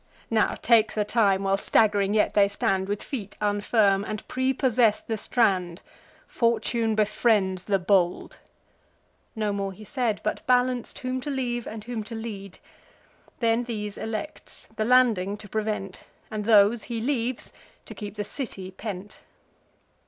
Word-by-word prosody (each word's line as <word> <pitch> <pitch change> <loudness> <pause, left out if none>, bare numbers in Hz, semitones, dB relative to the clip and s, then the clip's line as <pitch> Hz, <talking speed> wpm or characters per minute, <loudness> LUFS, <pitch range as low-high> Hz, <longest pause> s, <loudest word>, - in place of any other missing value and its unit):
Now 220 -2 +2
take 225 -2 +4
the 210 -1 +1
time, 205 -3 +2
while 195 0 +2
stagg'ring 205 -1 +2
yet 210 - +2
they 200 -1 +5
stand 195 -1 -1
With 205 0 -2
feet 210 -8 -6
unfirm, 205 -1 +2
and 215 0 -6
prepossess 255 -4 +2
the 225 - -3
strand: 190 -6 0 0.4
Fortune 230 -1 0
befriends 205 -3 +1
the 200 -2 +2
bold." 180 -1 +1 1.0
Nor 215 -2 -1
more 200 -1 -2
he 210 +3 -12
said, 235 -3 -1
But 215 - -2
balanc'd 250 -1 +1
whom 255 -1 -3
to 290 - -5
leave, 245 -4 -2
and 220 -1 -7
whom 230 -1 -4
to 230 - -7
lead; 205 -4 -7 0.8
Then 230 +1 +2
these 210 -3 -4
elects, 225 +7 -6
the 215 - -1
landing 225 -6 +3
to 210 - -12
prevent; 210 -2 -3 0.3
And 210 -1 -3
those 215 +1 +5
he 235 -2 -4
leaves, 245 0 -2 0.3
to - - -8
keep 205 -1 -8
the 210 - -3
city 195 -7 -6
pent. 200 0 -7
215 Hz, 145 wpm, -26 LUFS, 200-235 Hz, 1.0 s, they